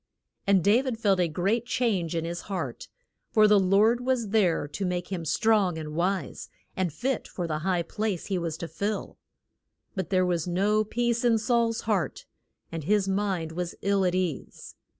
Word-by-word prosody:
And 195 -3 +4
Da 210 +6 +5
vid 260 -4 -3
felt 200 -4 +2
a 175 - +3
great 200 +9 0
change 200 -10 0
in 165 0 -1
his 170 +1 -4
heart, 195 - -4 0.4
for 215 -1 +5
the 210 -1 +6
Lord 205 +6 +3
was 250 -4 0
there 185 -8 +2
to 195 - -4
make 180 -1 -2
him 175 -4 -3
strong 205 -1 +2
and 155 -1 -6
wise, 175 -2 -2 0.3
and 185 -3 0
fit 250 - -2
for 175 - -4
the 155 -2 -2
high 175 +1 0
place 205 0 -3
he 190 -3 -1
was 165 -2 -3
to 170 - -5
fill. 205 +4 -4 0.7
But 190 -4 -3
there 185 -1 +3
was 175 -2 -1
no 205 +5 +2
peace 235 +2 -1
in 235 -2 +4
Saul's 230 0 +1
heart, 195 -10 -1 0.5
and 165 -2 -4
his 205 +1 +2
mind 190 -4 -1
was 175 +1 -4
ill 200 -1 +2
at 180 -1 +1
ease. 180 -6 -3
195 Hz, 185 wpm, -27 LUFS, 175-215 Hz, 0.7 s, the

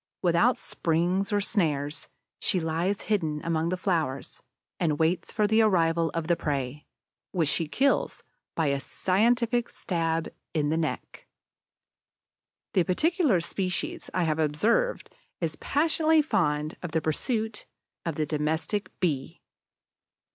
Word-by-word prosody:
Without 180 +8 +4
springs 175 +5 0
or 205 - +3
snares, 155 -8 0 0.3
she 185 - +1
lies 170 +5 -1
hidden 160 -8 0
among 165 0 0
the 185 - -1
flowers, 160 -8 -2 0.4
and 155 -4 +1
waits 165 +3 +1
for 210 - +1
the 220 +2 +4
arrival 170 -5 +3
of 165 -1 -1
the 170 +1 +2
prey, 140 -2 -3 0.5
which 170 -5 +2
she 165 +2 0
kills 270 - +1 0.3
by 165 - +1
a 140 0 0
scientific 235 - +1
stab 165 -2 -1 0.3
in 150 -2 +1
the 160 - +1
neck. 165 - -4 1.5
The 190 - +4
particular 295 - +2
species 185 +1 -3
I 180 - 0
have 160 -1 0
observed 205 - +1 0.3
is 160 -3 -2
passionately 315 +1 +3
fond 155 - 0
of 175 -3 -6
the 160 - +2
pursuit 220 - -2 0.4
of 165 -3 -3
the 155 - 0
Domestic 160 +7 -1
Bee. 145 -7 -1
170 Hz, 130 wpm, -27 LUFS, 155-210 Hz, 1.5 s, Without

